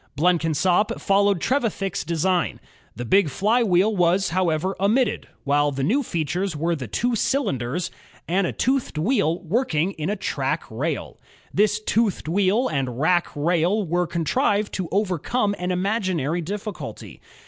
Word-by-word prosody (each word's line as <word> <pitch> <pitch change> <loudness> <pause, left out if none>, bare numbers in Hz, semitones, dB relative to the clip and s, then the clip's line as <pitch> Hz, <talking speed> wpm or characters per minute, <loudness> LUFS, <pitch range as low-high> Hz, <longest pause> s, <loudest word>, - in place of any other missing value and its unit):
Blenkinsop 175 +3 +2
followed 200 -1 +2
Trevithick's 215 - -1
design. 170 +1 0 0.4
The 120 - -5
big 190 - +3
flywheel 210 - +2
was, 180 +2 +2
however, 180 +1 0
omitted, 215 +4 +1 0.2
while 145 0 +2
the 135 -1 -3
new 240 - +2
features 175 - -2
were 165 +3 0
the 130 -6 -6
two 240 - 0
cylinders 170 - -1 0.4
and 185 +2 +1
a - - -2
toothed 260 - -1
wheel 170 - +1
working 180 - 0
in 155 -3 -4
a 210 - -1 0.2
rack - - 0
rail. - - -3 0.3
This 210 0 +2
toothed 215 -5 0
wheel 200 +8 +2
and 130 -5 -2
rack 175 +3 +3
rail 175 +7 +1
were 175 +1 0
contrived 205 - 0
to 185 -3 -3
overcome 205 +3 0
an 180 0 -2
imaginary 180 - 0
difficulty. 205 +5 -6
185 Hz, 135 wpm, -23 LUFS, 160-205 Hz, 0.4 s, big